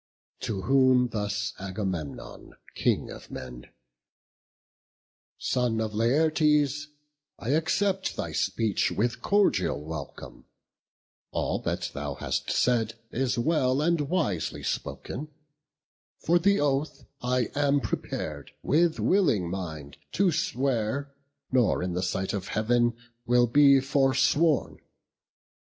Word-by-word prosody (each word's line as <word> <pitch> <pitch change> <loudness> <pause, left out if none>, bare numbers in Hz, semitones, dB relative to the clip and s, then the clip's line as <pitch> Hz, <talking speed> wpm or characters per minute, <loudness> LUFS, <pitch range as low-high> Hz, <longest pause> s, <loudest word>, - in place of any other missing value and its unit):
To 95 -4 -3
whom 130 -1 +4
thus 105 -1 -2
Agamemnon, 95 -6 -5 0.2
King - - 0
of - - -11
men: 60 -1 -8 1.7
"Son 125 -3 0
of 110 -1 -2
Laertes, 150 +4 +2 0.5
I 115 - -6
accept 190 +6 +1
thy - - -4
speech 110 -3 0
With 120 +3 -1
cordial 105 - +2
welcome: 75 -1 -8 0.8
all - - -1
that 85 0 -3
thou 70 -1 -4
hast - - -3
said 115 -3 +1 0.2
Is 130 0 -1
well 130 0 +2
and 155 -2 +1
wisely 105 - -1
spoken; 150 +4 -4 0.9
for 175 +2 +2
the 200 +3 +3
oath, 145 +1 -1 0.2
I 125 -1 0
am 145 0 +2
prepar'd, 75 - -4
with 165 +2 +2
willing 130 - +2
mind, 80 -7 -6 0.2
to 190 -1 +3
swear; 140 - -1 0.4
Nor 125 -8 +2
in 90 -1 -2
the 90 - -1
sight 95 +3 -2
of 100 -2 -3
Heav'n 120 +2 +1 0.3
will 120 0 +5
be 140 +3 +6
forsworn. 135 +3 +2
125 Hz, 110 wpm, -27 LUFS, 100-145 Hz, 1.7 s, be